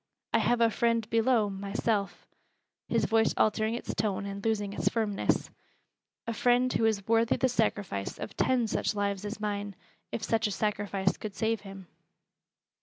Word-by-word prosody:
I - - +5
have 240 0 +2
a 230 -1 +5
friend 230 -1 +1
below 230 -1 +3
myself," 200 +1 -2 0.6
his - - +1
voice 225 0 +2
altering 220 +1 +2
its 240 - -4
tone 200 -1 -1
and 200 0 -6
losing 205 -3 0
its - - +1
firmness, 215 -3 0 0.7
"a 230 - -2
friend 245 +3 +3
who 225 - +2
is 210 -3 0
worthy 225 0 +3
the 260 - +2
sacrifice 205 - -1
of - - -7
ten 250 -2 +2
such 215 - -1
lives 200 -1 -1
as 210 +2 -5
mine, 205 -1 -3 0.4
if 220 - -4
such 225 0 +1
a - - -3
sacrifice 200 -2 -1
could 210 -2 -6
save 220 +2 0
him." 195 -1 -10
215 Hz, 165 wpm, -29 LUFS, 200-230 Hz, 0.7 s, I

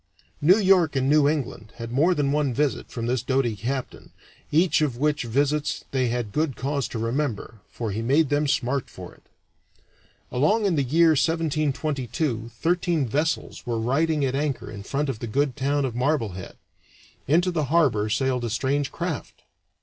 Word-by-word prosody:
New 175 +7 +6
York 185 -7 +4
and 135 0 +1
New 145 0 +4
England 125 -8 -4
had 115 -1 -7
more 160 +8 +3
than 140 -3 +1
one 145 -4 0
visit 145 -1 -1
from 115 -2 -5
the 125 +2 +1
doughty 130 -2 0
captain, 125 +5 -5 0.4
each 165 +2 +3
of 140 -6 0
which 145 -1 0
visits 145 +5 0
they 130 -2 +1
had 120 -3 -2
good 150 -1 0
cause 140 0 -2
to - - -6
remember, 115 -2 -2
for 115 -3 -4
he 105 +3 -3
made 140 +5 +2
them 145 +1 +1
smart 135 -1 0
for - - -10
it. - - -22 1.1
Along 205 - +2
in 190 -4 +2
the 145 - +2
year 160 +6 +4
1722 150 -6 0
thirteen 170 +1 0
vessels 150 +1 -2
were 115 -2 -1
riding 145 +5 +1
at 130 - -1
anchor 140 -1 -2
in 100 -2 -8
front 140 +8 -2
of 130 -5 -3
the 120 - -5
good 135 +3 0
town 140 +1 0
of 125 - -3
Marblehead. 115 - -2 0.7
Into 175 +6 +3
the 155 -4 -1
harbor 135 -9 +2
sailed 125 +2 0
a 120 - -2
strange 135 +5 -1
craft. 170 -6 -5
140 Hz, 175 wpm, -24 LUFS, 120-155 Hz, 1.1 s, New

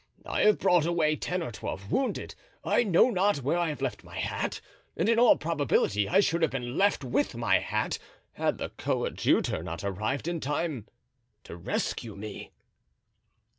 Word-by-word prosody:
I - - -1
have 210 -1 +5
brought 175 -4 +3
away 160 -3 +2
ten 180 +3 -2
or 140 - -5
twelve 100 -1 -6
wounded. 270 - -1 0.3
I - - +3
know 205 +4 +4
not 195 - +1
where 160 +7 +1
I 170 -2 +1
have 145 -3 -5
left 135 - -3
my - - -10
hat, - - -2 0.4
and 170 - +1
in 230 0 +4
all 240 -1 +7
probability 145 -10 +1
I 190 +3 +5
should 170 -3 +1
have 160 - +3
been 125 -1 -4
left 200 -5 +2
with 130 +1 0
my 115 -1 +3
hat, - - -2 0.3
had - - -1
the - - -4
coadjutor - - 0
not 85 +3 -6
arrived 110 - -2
in 170 -1 -1
time 145 -4 -2 0.6
to - - -9
rescue 100 +5 -3
me." 105 0 -8
150 Hz, 170 wpm, -28 LUFS, 120-175 Hz, 0.6 s, all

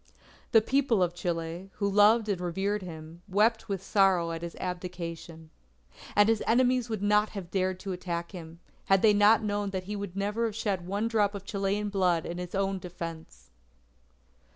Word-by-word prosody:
The 225 -2 +6
People 255 -6 +2
of 175 -1 -1
Chile, 175 +1 -4
who 200 - -1
loved 210 +3 +5
and 195 -4 -1
revered 195 +4 -1
him, 165 -1 -9
wept 215 +3 +2
with 195 -2 -3
sorrow 190 -4 +3
at 165 0 -5
his 170 0 -6
abdication. 170 -3 -6 0.6
And 205 0 +6
his 225 -1 +2
enemies 250 0 +3
would 215 -3 -3
not 210 +1 +3
have 175 -3 -7
dared 185 -1 0
to 195 - -5
attack 170 -2 -4
him, 170 -2 -10 0.2
had 195 -1 +3
they 215 -2 +6
not 210 +2 +5
known 205 -1 -1
that 190 -1 -4
he 205 +3 -5
would 200 -3 -6
never 210 +3 -1
shed 200 -5 -2
one 205 +4 -1
drop 210 -3 +1
of 200 0 -7
Chilean 200 +1 -1
blood 180 -5 +1
in 175 +1 -5
his 180 +1 -6
own 195 0 0
defense. 165 - -8
195 Hz, 175 wpm, -28 LUFS, 175-210 Hz, 0.6 s, The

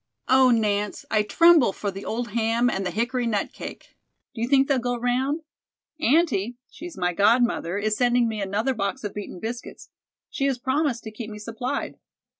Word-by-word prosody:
Oh, 260 0 +5
Nance, 210 -3 0
I 215 - +3
tremble 320 +2 +5
for 200 0 -3
the 195 +1 -8
old 235 0 -3
ham 230 +2 +1
and 195 - -2
the 180 - -1
hickory 240 +5 -1
nut 210 -3 -1
cake. - - -9 0.4
Do 225 - -6
you 235 - 0
think 270 0 +4
they'll 275 -3 +2
go 245 0 -2
round? 255 +6 0 0.6
Aunty, 255 - +2
she's 345 0 -9
my 180 -1 0
godmother, 210 -2 +2
is 215 +1 0
sending 245 -1 +3
me 220 -2 -3
another 210 +7 0
box 220 +4 -3
of 205 - -4
beaten 205 -3 -7
biscuits. 235 +4 -7 0.4
She 275 - -1
has 270 -2 0
promised 260 -1 -1
to 220 - -7
keep 220 0 -7
me 210 - -8
supplied. 230 +4 -4
235 Hz, 185 wpm, -24 LUFS, 210-255 Hz, 0.6 s, Oh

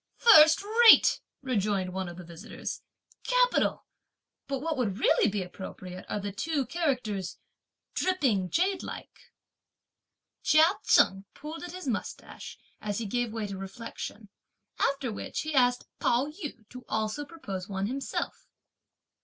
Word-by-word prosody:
"First 320 -7 +7 0.2
rate!" 450 - +8 0.2
rejoined 200 -7 -1
one 190 -1 -3
of 175 - -10
the 180 - -8
visitors, 170 +5 -7 0.4
"capital! - - +2 0.6
but 275 - -2
what 320 +3 -2
would 220 -8 -1
really 225 -2 +3
be 200 -1 -2
appropriate 185 0 -9
are - - -2
the 200 0 -4
two 285 +6 -1
characters 250 - -2 0.6
'dripping 260 - +1
jadelike.'" 370 - -3 1.1
Chia 310 +1 +6 0.2
Chen 195 +1 +4
pulled 310 +2 -8
at 355 -1 -7
his 365 -4 -7
moustache, 230 -5 -5 0.2
as 205 -1 -3
he 230 - -3
gave 240 +2 -1
way 220 -1 -3
to 200 -2 -6
reflection; 205 +1 -8 0.5
after 275 -3 0
which, 210 - -4
he 310 0 -4
asked 250 -2 +3
Pao 240 +3 +2
yü 295 - -8
to 250 0 -10
also 220 +6 -1
propose 200 - -7
one 195 0 -2
himself. 270 +6 -4
235 Hz, 135 wpm, -28 LUFS, 195-300 Hz, 1.1 s, rate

